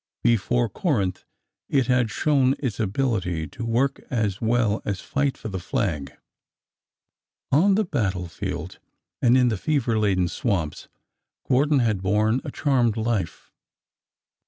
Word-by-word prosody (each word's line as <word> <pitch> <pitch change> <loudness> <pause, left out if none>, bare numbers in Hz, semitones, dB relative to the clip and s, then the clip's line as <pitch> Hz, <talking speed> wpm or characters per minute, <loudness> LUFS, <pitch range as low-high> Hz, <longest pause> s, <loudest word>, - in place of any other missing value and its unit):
Before 120 +1 +2
Corinth 100 - -1 0.4
it 135 -3 +2
had 125 -1 +2
shown 135 0 +2
its 120 -8 -3
ability 95 -7 -1
to 115 - -7
work 120 +4 0
as 105 -6 -1
well 115 -2 +1
as 100 -2 -3
fight 140 -1 -1
for 110 - -6
the 95 -2 -4
flag. 80 -6 -2 1.4
On 190 +8 +4
the 215 +1 +1
battle 95 - -1
field 85 - -6 0.4
and 125 +1 +5
in 125 -1 +4
the 110 - -1
fever 120 -2 0
laden 95 -4 +2
swamps, 85 -6 -2 0.6
Gordon 140 +2 +3
had 110 -5 0
borne 105 +5 +1
a 150 - -5
charmed 125 -6 +1
life. 110 -6 -2
115 Hz, 135 wpm, -24 LUFS, 100-130 Hz, 1.4 s, and